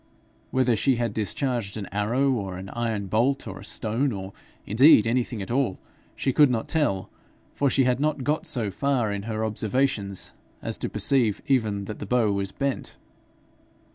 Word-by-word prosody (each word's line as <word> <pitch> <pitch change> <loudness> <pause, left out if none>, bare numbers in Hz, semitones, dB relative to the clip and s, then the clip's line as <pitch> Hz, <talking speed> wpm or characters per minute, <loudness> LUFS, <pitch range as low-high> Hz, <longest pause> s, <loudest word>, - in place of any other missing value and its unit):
Whether 130 -2 +2
she 130 +5 +2
had 115 -3 -1
discharged 110 0 -1
an 105 - -4
arrow, 120 +7 +1
or 100 -7 -3
an 95 +1 -8
iron 115 -3 -2
bolt, 120 +8 +1
or - - -7
a - - -11
stone, 120 +5 0
or 95 -2 -6 0.3
indeed 115 +2 +6
anything 115 -2 -1
at 95 - -7
all, 125 -7 +1 0.4
she 135 - -1
could 145 0 +6
not 115 -3 -1
tell, 140 - 0 0.4
for 140 - +1
she 135 - +3
had 125 0 +1
not 150 -2 0
got 150 +4 -1
so 110 -6 0
far 125 -1 0
in 100 -1 -3
her 110 0 -1
observations 110 -2 0 0.3
as - - -3
to - - -2
perceive 120 -7 +2
even 110 -7 +1
that 105 +1 -7
the 105 - -6
bow 115 -2 +2
was 100 -1 -1
bent. 140 -1 -3
115 Hz, 175 wpm, -25 LUFS, 100-135 Hz, 0.4 s, indeed